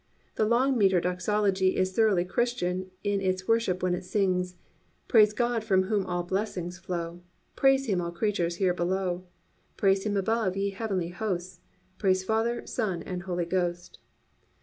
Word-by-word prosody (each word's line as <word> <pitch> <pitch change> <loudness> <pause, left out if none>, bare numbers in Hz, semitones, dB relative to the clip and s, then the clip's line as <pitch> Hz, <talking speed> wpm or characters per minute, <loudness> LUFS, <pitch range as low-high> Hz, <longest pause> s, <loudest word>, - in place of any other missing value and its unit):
The 215 - +1
long 250 +2 +2
metre 190 -3 +4
doxology 190 +2 +1
is 185 0 +1
thoroughly 200 -5 +3
Christian 185 -3 -1
in 205 -1 0
its 185 0 -1
worship 225 -6 +1
when 180 -1 +2
it 180 - -3
sings: 180 -2 0 0.5
"Praise 215 -3 +6
God 235 0 0
from 190 -3 +3
whom 200 -1 -1
all 175 -1 -1
blessings 180 -2 -3
flow, 170 -1 -5 0.3
Praise 270 0 +4
Him 195 -7 0
all 170 0 -3
creatures 175 -2 -1
here 185 0 +2
below, 180 0 -1 0.5
Praise 195 -1 +3
Him 205 -1 -1
above, 200 -1 0
ye 200 0 0
heavenly 195 -4 -2
hosts, 180 -1 -4 0.4
Praise 185 -2 +2
Father, 225 +4 0
Son 190 -5 -2
and 180 -1 -5
Holy 175 -2 -2
Ghost." 175 0 -2
190 Hz, 155 wpm, -28 LUFS, 180-215 Hz, 0.5 s, Praise